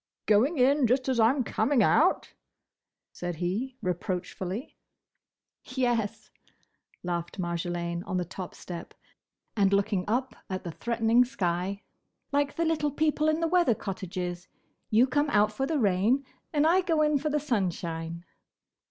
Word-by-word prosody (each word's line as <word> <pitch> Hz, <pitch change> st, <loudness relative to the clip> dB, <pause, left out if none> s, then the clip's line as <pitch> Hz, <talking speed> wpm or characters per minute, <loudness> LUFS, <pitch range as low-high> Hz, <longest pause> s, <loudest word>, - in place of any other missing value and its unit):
"Going 240 Hz, +10 st, +3 dB
in, 270 Hz, +1 st, +4 dB
just 255 Hz, +3 st, +1 dB
as 255 Hz, -2 st, +1 dB
I'm 250 Hz, +4 st, +4 dB
coming 240 Hz, +3 st, +2 dB
out?" -, -, +3 dB, 0.8 s
said 175 Hz, -1 st, -5 dB
he, 205 Hz, +10 st, -3 dB
reproachfully. 185 Hz, -, -3 dB, 0.9 s
"Yes," 245 Hz, -5 st, -1 dB, 0.7 s
laughed 175 Hz, 0 st, -3 dB
Marjolaine 170 Hz, 0 st, -2 dB
on 185 Hz, -2 st, -1 dB
the 180 Hz, -, -1 dB
top 185 Hz, +1 st, -7 dB
step, 175 Hz, -2 st, -8 dB, 0.6 s
and 200 Hz, -3 st, +3 dB
looking 200 Hz, -2 st, +1 dB
up 245 Hz, +2 st, -1 dB
at 185 Hz, -1 st, -4 dB
the 170 Hz, -, -5 dB
threatening 230 Hz, +5 st, +2 dB
sky, 190 Hz, -4 st, -2 dB, 0.5 s
"like 285 Hz, 0 st, +1 dB
the 335 Hz, -, 0 dB
little 315 Hz, -2 st, +1 dB
people 305 Hz, +1 st, +1 dB
in 310 Hz, +1 st, 0 dB
the 330 Hz, -, +2 dB
weather 345 Hz, -9 st, +3 dB
cottages: 180 Hz, -2 st, -5 dB, 0.4 s
you 225 Hz, +3 st, +5 dB
come 290 Hz, +3 st, +1 dB
out 210 Hz, -3 st, +3 dB
for 270 Hz, +5 st, -1 dB
the 315 Hz, -, 0 dB
rain; 220 Hz, +5 st, +2 dB, 0.3 s
and 300 Hz, -1 st, +2 dB
I 350 Hz, +4 st, +5 dB
go 325 Hz, -4 st, +2 dB
in 300 Hz, -1 st, +2 dB
for 305 Hz, +2 st, -1 dB
the 300 Hz, 0 st, +1 dB
sunshine." 170 Hz, -, -2 dB
225 Hz, 145 wpm, -28 LUFS, 180-280 Hz, 0.9 s, you